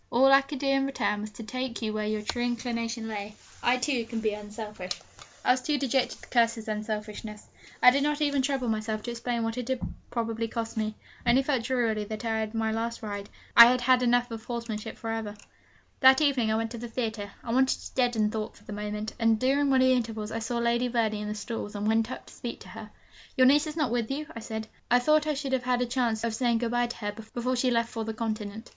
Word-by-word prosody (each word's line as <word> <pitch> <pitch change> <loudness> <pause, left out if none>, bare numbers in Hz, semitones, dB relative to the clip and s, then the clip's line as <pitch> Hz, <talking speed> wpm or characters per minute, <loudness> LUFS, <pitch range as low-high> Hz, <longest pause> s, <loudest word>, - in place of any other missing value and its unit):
All 260 +3 +5
I 275 0 +8
could 280 +1 -6
do 275 - -4
in 275 0 +3
return 210 -6 -1
was 215 - -5
to 225 - -8
take 255 +2 -4
you 215 -1 -1
where 215 0 -1
your 215 0 -1
true 240 +3 -2
inclination 235 -1 -2
lay. 210 -1 -5 0.3
I, 245 +1 +3
too, 250 -1 0
can 230 0 -4
be 215 -1 0
unselfish.' 210 -3 -6 0.5
I - - +6
was 255 0 +2
too 295 +3 0
dejected 265 -1 0
to - - -12
curse 230 -2 +3
his 225 -1 -9
unselfishness. 210 0 -4 0.4
I 250 - +10
did 280 +2 +1
not 295 +1 +1
even 285 -2 +2
trouble 265 -2 0
myself 215 -1 -1
to 240 - -4
explain 235 0 -2
what 225 +2 -2
it 245 - -4
had 260 -1 0 0.3
probably 230 -1 -2
cost 225 0 -4
me. 215 -1 -2 0.3
I 240 - +1
only 260 +3 +5
felt 265 -4 0
drearily 230 -5 +1
that 215 +2 -6
I - - 0
had 220 0 +1
had - - -17
my 220 0 0
last 230 +1 -3
ride, 205 -1 -5 0.3
I 235 0 +12
had 250 0 +2
had 255 +1 +4
enough 245 0 +2
of 225 -1 -6
horsemanship 230 -2 -5
for 225 - -4
ever! 220 -2 -3 0.6
That 265 0 +7
evening 270 -7 +2
I - - +2
went 225 0 -1
to 235 - -6
the 240 - -5
theatre, 225 -3 -3
I 230 - -4
wanted 265 +1 +3
to - - -10
deaden 240 -4 +2
thought 215 -1 -4
for - - -19
the 210 - -8
moment; 210 +1 -4
and 225 -1 +3
during 275 +3 +2
one 260 -1 +5
of - - +5
the 260 - +5
intervals 225 -3 -2
I 225 - -2
saw 235 +2 -2
Lady 235 +1 +2
Verney 225 -3 0
in 210 - -4
the 210 - -3
stalls, 210 0 -5
and 205 +1 -2
went 225 +1 +2
up - - -7
to - - -14
speak - - -6
to - - -11
her. - - -9 0.5
'Your 255 - +6
niece 290 +4 +5
is 305 +1 -6
not 295 -7 +1
with 235 -2 0
you?' 290 +3 -2
I - - -4
said; 220 0 -5 0.2
'I 245 - +6
thought 305 +4 +3
I 305 - +1
should 275 -1 -3
have 260 - +2
had 250 -1 +2
a 250 - +1
chance 240 -3 0
of 230 - +1
of - - -5
saying 240 -1 +2
good 230 0 -1
bye 240 0 +2
to 240 - -6
her 205 -1 -3
before 235 +4 -3
she 255 +1 +2
left 230 -1 +1
for 225 - -4
the 220 0 -4
continent.' 220 0 -4
230 Hz, 260 wpm, -28 LUFS, 220-255 Hz, 0.6 s, I